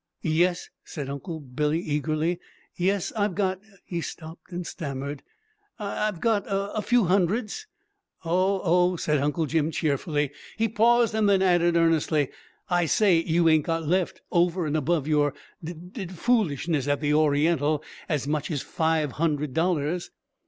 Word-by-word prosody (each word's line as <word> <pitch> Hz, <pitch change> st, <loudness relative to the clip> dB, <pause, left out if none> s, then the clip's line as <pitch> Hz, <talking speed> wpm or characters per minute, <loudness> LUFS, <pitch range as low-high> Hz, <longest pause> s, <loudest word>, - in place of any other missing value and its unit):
"Yes," 175 Hz, +3 st, +1 dB
said 140 Hz, -4 st, -6 dB
Uncle 160 Hz, +4 st, -6 dB
Billy 150 Hz, +3 st, -1 dB
eagerly. 155 Hz, +2 st, -1 dB, 0.4 s
"Yes! 190 Hz, +1 st, 0 dB
I've 205 Hz, -4 st, 0 dB
got" 190 Hz, -2 st, 0 dB, 0.3 s
He 170 Hz, -2 st, -3 dB
stopped 160 Hz, +2 st, -9 dB
and 175 Hz, 0 st, -4 dB
stammered. 140 Hz, -4 st, -5 dB, 0.6 s
"I've 210 Hz, -3 st, -2 dB
got 220 Hz, -1 st, +2 dB
a 200 Hz, +1 st, -2 dB
few 245 Hz, +1 st, +3 dB
hundreds." 200 Hz, -, 0 dB, 0.6 s
"Oh, 185 Hz, +3 st, +1 dB
oh!" 180 Hz, +1 st, +3 dB
said 150 Hz, -3 st, 0 dB
Uncle 150 Hz, +3 st, 0 dB
Jim 155 Hz, 0 st, +1 dB
cheerfully. 150 Hz, -2 st, -1 dB, 0.3 s
He 225 Hz, +1 st, +2 dB
paused, 230 Hz, +1 st, +3 dB
and 215 Hz, -2 st, +2 dB
then 195 Hz, -1 st, +4 dB
added 175 Hz, -2 st, +3 dB
earnestly, 160 Hz, -3 st, +2 dB, 0.4 s
"I 175 Hz, -2 st, +1 dB
say! 185 Hz, -2 st, +4 dB
You 165 Hz, 0 st, +2 dB
ain't 155 Hz, -2 st, +4 dB
got 165 Hz, -1 st, -1 dB
left, 180 Hz, +3 st, 0 dB
over 175 Hz, 0 st, +2 dB
and 150 Hz, 0 st, -1 dB
above 155 Hz, 0 st, +1 dB
your 150 Hz, -2 st, +2 dB, 0.3 s
d 165 Hz, +2 st, -5 dB
d 180 Hz, +4 st, -8 dB
foolishness 170 Hz, -, 0 dB
at 145 Hz, -1 st, +1 dB
the 150 Hz, 0 st, +1 dB
Oriental, 150 Hz, 0 st, +2 dB, 0.3 s
as 145 Hz, -4 st, -1 dB
much 150 Hz, -1 st, -1 dB
as 150 Hz, -5 st, -2 dB
five 160 Hz, -3 st, 0 dB
hundred 150 Hz, -4 st, 0 dB
dollars?" 170 Hz, 0 st, 0 dB
165 Hz, 150 wpm, -26 LUFS, 150-185 Hz, 0.6 s, then